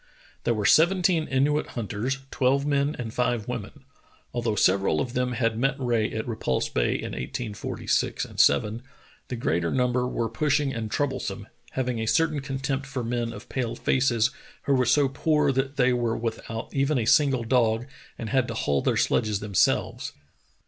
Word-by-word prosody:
There 115 - +2
were 105 -1 -2
seventeen 175 - +4
Inuit 145 +3 +1
hunters, 115 +4 -2
twelve 135 0 +2
men 145 +1 +1
and 115 -3 -5
five 120 -3 0
women. 125 +3 -6 0.5
Although 115 -3 -1
several 95 -5 +3
of 125 - -2
them 125 0 0
had 115 -2 0
met 135 +2 +2
Rae 120 -4 0
at 110 +2 -4
Repulse 110 - -1
Bay - - +1
in - - -4
1846 105 - -2
7, 105 +11 +3 0.5
the 125 - -4
greater 85 -7 0
number 125 +1 +1
were 115 -2 -1
push 145 +7 +1
ing 140 -2 -1
and 110 -2 -4
troublesome, 130 -9 -2 0.3
having 125 -3 -1
a 110 - -2
certain 155 +3 +2
contempt 135 0 -3
for 135 -3 -4
men 120 0 -2
of - - -10
pale 125 -4 -2
faces 125 -3 +2 0.3
who 140 - +1
were 130 -2 +2
so 140 +2 +4
poor 150 +1 +1
that 135 +1 -1
they 125 -1 +4
were 120 -2 0
without 115 0 -5
even 140 +1 +1
a 115 - 0
single 135 0 +4
dog 115 -1 +2 0.3
and 115 - -5
had 130 0 +2
to 115 - -4
haul 70 -10 0
their - - +1
sledges 105 -2 +1
them 105 -1 -7
selves. - - +1
125 Hz, 175 wpm, -26 LUFS, 115-135 Hz, 0.5 s, seventeen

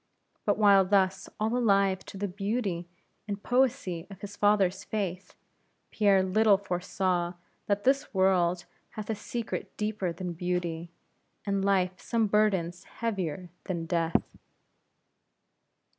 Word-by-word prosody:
But - - +2
while 200 -2 +6
thus 190 0 +1
all 220 +3 0
alive 200 -5 +3
to - - -8
the 205 +1 -1
beauty 195 -2 -2 0.4
and 200 -1 -4
poesy 245 -9 +1
of 195 -2 -11
his 205 0 -7
father's 205 -3 +2
faith, 195 -3 -4 0.6
Pierre 200 -3 +4
little 205 +2 +4
foresaw 180 -2 -1 0.3
that 205 0 0
this 275 +2 +2
world 185 -2 +2 0.3
hath 215 +1 -3
a - - -1
secret 235 +2 -5
deeper 210 -4 -1
than 175 +1 -5
beauty, 175 -1 -2 0.6
and 200 -1 0
Life 185 -2 +1
some 230 -2 +1
burdens 195 -5 +1
heavier 185 -7 -4
than 170 -4 -3
death. 165 0 +1
195 Hz, 125 wpm, -29 LUFS, 180-210 Hz, 0.6 s, while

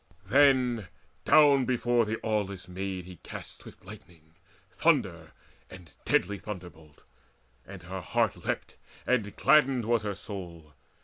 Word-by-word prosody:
Then 125 -3 +3 0.4
down 145 -4 +6
before 120 -1 +1
the 110 +1 -2
aweless 100 -4 -2
Maid 95 0 -5
he 90 -1 -11
cast - - -9
Swift - - -15
lightning, 85 -6 -14 0.4
thunder, 90 - 0 0.4
and 90 -5 -13
deadly 100 +2 +1
thunderbolt; 85 -7 -10 0.6
And 95 -2 -10
her 95 +1 -6
heart 85 - 0
leapt, - - -4 0.3
and 110 -5 0
gladdened 135 -4 +3
was 115 0 +2
her 105 -1 -4
soul. 85 -6 -9
100 Hz, 125 wpm, -28 LUFS, 90-120 Hz, 0.6 s, down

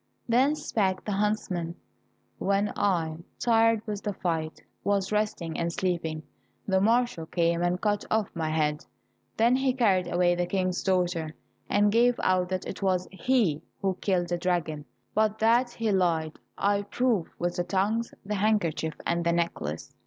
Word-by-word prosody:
Then 260 +5 +3
spake 190 -9 -1
the 210 - -2
huntsman, 195 -5 -1 0.6
"When 200 +1 +1
I, 165 -6 0 0.2
tired 225 -2 +3
with 210 -2 -4
the 205 - -3
fight, 160 -4 -3 0.2
was 200 -1 0
resting 210 -6 -1
and 170 0 0
sleeping, 170 -3 -2 0.4
the 190 -1 +2
marshal 230 -5 +1
came 170 0 +1
and 175 +1 +1
cut 205 0 0
off 220 -2 +1
my 160 -2 -1
head. 150 -1 0 0.5
Then 235 +3 +4
he 265 0 +1
carried 190 -8 +2
away 175 0 +3
the 175 0 -1
King's 185 -1 0
daughter, 175 -4 0 0.3
and 205 0 +3
gave 240 +2 +3
out 185 -1 +2
that 185 0 -2
it 190 - -6
was 185 -2 +1
he 195 - +1 0.2
who 195 - 0
had 185 - -21
killed 180 -3 +1
the 175 0 -1
dragon, 170 -4 -1 0.3
but 215 0 +2
that 235 +3 +3
he 230 -2 -2
lied 165 -5 +1 0.2
I 200 0 +2
prove 215 -2 0
with 175 0 -2
the 175 - +1
tongues, 205 +5 0
the 210 - -2
handkerchief, 190 -7 0
and 170 0 0
the 170 - +2
necklace." 165 - -2
190 Hz, 165 wpm, -27 LUFS, 170-215 Hz, 0.6 s, Then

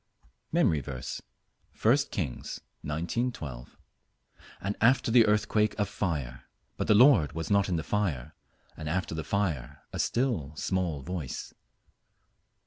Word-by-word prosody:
MEMORY 80 - +3
VERSE, 65 -2 -5 0.6
I 115 +4 +7
Kings 75 - -4 0.2
19: 85 - -1
12 65 - -8 0.8
"And 100 +2 -2
after 120 0 +4
the 115 -1 +6
earthquake 105 0 +2
a 105 - +2
fire; 75 -11 -3 0.3
but - - -2
the 105 - +6
Lord 110 - +6
was 80 +5 -4
not 100 -1 +3
in 90 - +1
the 80 - -1
fire: 80 -9 -1 0.4
and 80 -1 -5
after 90 0 -1
the 80 0 -3
fire 85 -12 -2
a - - -4
still 115 - 0
small 85 -4 -1
voice." 80 -4 -5
90 Hz, 135 wpm, -29 LUFS, 75-105 Hz, 0.8 s, I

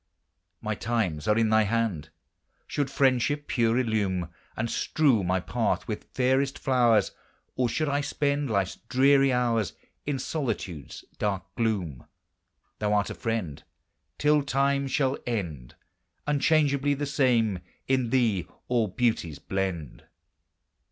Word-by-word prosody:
My 110 0 -1
times 105 -9 -1
are 105 0 +3
in 115 -1 +3
thy 110 0 +5
hand! 105 -8 -1 0.6
Should 140 -2 -2
friendship 140 +2 +2
pure 115 -1 +1
illume 100 -8 0 0.3
And 110 - 0
strew 130 -3 +2
my 90 +1 +1
path 90 - -1
with - - -4
fairest 135 +2 +2
flowers, 120 -6 +3 0.4
Or 125 -2 +1
should 155 +6 -1
I 145 0 +1
spend 145 -1 -1
life's 100 -3 0
dreary 135 +1 +5
hours 120 -5 +1 0.3
In 145 -2 0
solitude's 115 - -4
dark 100 -3 -1
gloom, 95 - -2 0.7
Thou 105 -1 0
art 105 -1 +1
a - - -3
friend. 110 -11 -3 0.5
Till 150 0 +3
time 140 0 +1
shall 135 0 0
end 85 - -4 0.5
Unchangeably 145 -1 +2
the 145 +1 -2
same; 125 -8 +2 0.3
in 130 -3 +1
thee 110 -9 +1 0.2
all 120 -3 +2
beauties 95 - 0
blend. 85 -3 -4
115 Hz, 125 wpm, -27 LUFS, 100-135 Hz, 0.7 s, thy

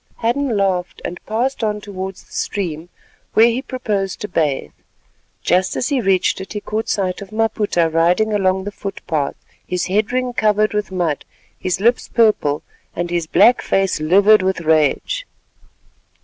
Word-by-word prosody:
Hadden 240 0 0
laughed, 185 -3 0
and 175 - -6
passed 245 +3 -1
on 210 -1 0
towards 190 -2 -7
the - - -27
stream 170 -4 -3 0.5
where 225 - +7
he 235 +2 +1
proposed 210 -8 -3
to 210 - -3
bathe. 150 - -1 0.7
Just 185 +1 +2
as - - -1
he 275 -4 +1
reached 190 -2 +2
it, 190 - -8
he 210 - -3
caught 215 +2 -3
sight 185 -2 -1
of 200 - -8
Maputa 215 -6 +1
riding 175 +7 +2
along 190 -2 +1
the 205 - -5
footpath, 170 -8 -3 0.3
his 180 -1 -1
head 205 +3 0
ring 255 0 -1
covered 215 -2 +2
with 210 -2 -2
mud, 170 -6 -1 0.3
his 185 -1 -2
lips 235 +4 +2
purple 210 -10 +2 0.3
and 175 0 -3
his 170 -2 -1
black 205 +9 +5
face 195 -4 +1
livid 195 +7 +5
with 185 -1 0
rage. 160 - +1
195 Hz, 160 wpm, -19 LUFS, 180-220 Hz, 0.7 s, where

